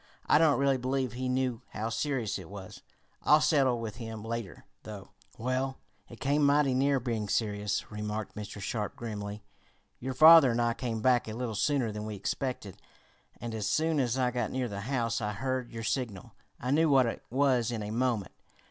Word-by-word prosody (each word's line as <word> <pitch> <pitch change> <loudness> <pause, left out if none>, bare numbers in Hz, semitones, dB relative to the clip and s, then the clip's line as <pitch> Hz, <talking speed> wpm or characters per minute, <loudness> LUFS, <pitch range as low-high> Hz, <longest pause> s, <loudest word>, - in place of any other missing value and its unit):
I - - +5
don't 155 -3 +4
really 140 -1 +2
believe 130 0 -1
he 130 +1 -3
knew 125 -2 0
how 110 +2 -2
serious 125 -6 -1
it 90 - -11
was. 95 -2 -9 0.4
I'll 150 - +5
settle 135 -6 +3
with 115 -1 -5
him 110 -2 -7
later, 115 -3 -5 0.2
though." 105 -3 -9 0.3
"Well, 130 +3 -1 0.3
it 120 - -12
came 145 +2 +1
mighty 140 -1 +4
near 135 +1 +2
being 115 -4 -3
serious," 105 -2 -1
remarked 105 0 -4
Mr. 105 -1 -7
Sharp 105 +1 -3
grimly. 105 -2 -6 0.6
"Your 130 +1 -4
father 160 -1 +9
and 120 0 0
I 120 0 +2
came 115 -3 -3
back 125 0 +3
a 110 - -5
little 120 0 -3
sooner 125 +1 +1
than 105 0 -5
we 105 - -5
expected, 105 -1 -4 0.6
and 120 -1 -5
as 110 -2 -2
soon 160 +5 +1
as 125 -1 0
I 125 -1 +1
got 120 -3 -1
near 130 -1 -2
the 100 -2 -5
house 115 -1 -1
I 105 -1 -2
heard 130 +2 -3
your 115 -1 -6
signal. 115 -5 -3 0.3
I 125 - -2
knew 160 +2 +4
what 135 -3 +5
it 115 - -3
was 125 -2 +2
in 110 -3 -3
a 105 - -5
moment. 115 -4 0
120 Hz, 190 wpm, -30 LUFS, 110-130 Hz, 0.6 s, father